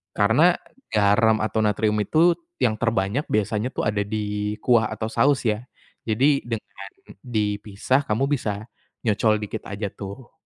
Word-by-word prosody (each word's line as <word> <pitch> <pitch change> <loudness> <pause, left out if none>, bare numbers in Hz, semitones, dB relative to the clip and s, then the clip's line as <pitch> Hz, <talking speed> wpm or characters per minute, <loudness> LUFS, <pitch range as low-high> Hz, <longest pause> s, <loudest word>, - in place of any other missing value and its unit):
karena 135 +13 +4 0.4
garam 110 +1 +4
atau 110 +1 -1
natrium 105 0 +1
itu 160 - +4 0.3
yang 110 -3 +1
terbanyak 115 +3 0
biasanya 105 +2 0
tuh - - -1
ada 105 -1 0
di 105 0 -2
kuah 115 -3 +4
atau 110 +1 -4
saus 140 -2 +2
ya 105 -3 +1 0.5
jadi 135 +6 +3
dengan 105 -3 -6 0.3
dipisah 105 +2 -1
kamu 110 +5 +1
bisa, 105 -7 -1 0.4
nyocol 110 0 +3
dikit 105 +1 -5
aja 100 -1 -4
tuh. 105 +8 -10
110 Hz, 135 wpm, -23 LUFS, 105-120 Hz, 0.5 s, karena